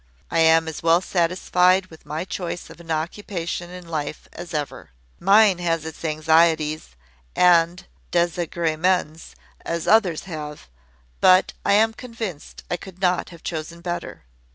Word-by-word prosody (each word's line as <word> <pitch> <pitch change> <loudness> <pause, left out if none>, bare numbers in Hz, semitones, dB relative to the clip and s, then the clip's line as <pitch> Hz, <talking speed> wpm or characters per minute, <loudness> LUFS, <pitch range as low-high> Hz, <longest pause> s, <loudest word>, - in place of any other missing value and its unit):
I 165 - +1
am 160 0 +5
as 160 - -5
well 165 +1 +4
satisfied 180 +1 +2
with 160 -1 -15
my 155 +4 -3
choice 175 -2 -5
of - - -14
an 170 -1 -14
occupation 170 +1 -3
in 180 -1 -10
life 155 -2 -4
as 175 +1 -9
ever. 150 -2 -4 0.3
Mine 200 0 +5
has 165 -2 -1
its 160 0 -8
anxieties, 155 - +2 0.4
and 175 0 +4 0.3
desagremens, 170 -1 0 0.3
as 170 -1 -3
others 195 -8 +3
have: 150 - -8 0.5
but 185 0 +5
I - - +3
am 220 +2 +4
convinced 225 - -7
I 180 - 0
could 185 0 -12
not 180 -1 +1
have 170 -2 -14
chosen 165 +1 -5
better. 175 0 -5
170 Hz, 140 wpm, -23 LUFS, 160-180 Hz, 0.5 s, am